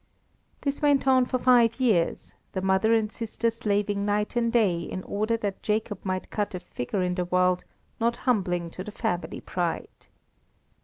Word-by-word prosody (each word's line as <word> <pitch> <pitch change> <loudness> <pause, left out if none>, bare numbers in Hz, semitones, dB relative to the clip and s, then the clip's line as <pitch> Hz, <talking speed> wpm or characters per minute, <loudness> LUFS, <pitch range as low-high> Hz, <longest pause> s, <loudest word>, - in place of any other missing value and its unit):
This 280 0 -2
went 285 -2 +3
on 260 -1 +5
for 255 - 0
five 245 -2 +4
years, 210 -10 +1 0.2
the 190 - -2
mother 190 +3 +3
and 220 -2 +2
sister 230 +1 -1
slaving 205 -2 0
night 210 +2 0
and 235 -1 +2
day 210 -8 +3
in 185 +2 -5
order 215 +3 -1
that 205 -3 -4
Jacob 210 -2 -2
might 185 -1 -3
cut 205 -2 -2
a - - -3
figure 180 +1 -3
in 180 0 0
the 180 0 -1
world 180 0 +2 0.3
not 235 +1 +1
humbling 180 -8 +1
to 185 - -6
the 210 - -7
family 175 -5 -3
pride. 175 -2 -4
205 Hz, 170 wpm, -26 LUFS, 185-230 Hz, 0.3 s, on